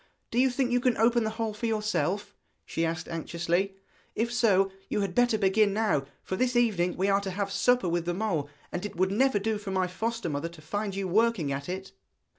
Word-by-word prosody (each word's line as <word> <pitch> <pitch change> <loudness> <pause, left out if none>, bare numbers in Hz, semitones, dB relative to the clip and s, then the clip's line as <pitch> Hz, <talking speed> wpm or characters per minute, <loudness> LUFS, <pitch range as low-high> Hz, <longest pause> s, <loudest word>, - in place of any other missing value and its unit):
Do 235 - +1
you 260 +1 +5
think 250 0 0
you 245 - +3
can 250 -1 +1
open 230 +1 +3
the - - 0
hole 225 -2 -1
for 230 +3 -3
yourself?' 210 -2 -1 0.3
she 165 - -2
asked 165 0 -2
anxiously. 170 +3 -1 0.4
'If 235 +2 -1
so, 195 -5 +3 0.2
you 210 - 0
had 195 -3 -2
better 245 +1 +3
begin 200 0 +3
now, 210 -10 +1 0.2
for 190 - -3
this 250 +4 +1
evening 200 -7 +2
we 190 +2 +1
are 200 0 +3
to 195 - -4
have 200 +1 -2
supper 245 0 +3
with 170 0 0
the 175 0 -1
mole, 175 -9 -1 0.2
and 175 - -3
it 210 - -5
would 185 +2 +1
never 260 +2 +3
do 215 +1 -1
for 205 -1 -7
my 190 -1 +1
foster 225 +4 -3
mother 150 +2 -2
to 170 -1 -14
find 205 +4 -3
you 195 -1 -2
working 205 -5 +2
at 140 +4 -4
it.' 190 +1 -5
200 Hz, 225 wpm, -28 LUFS, 180-225 Hz, 0.4 s, you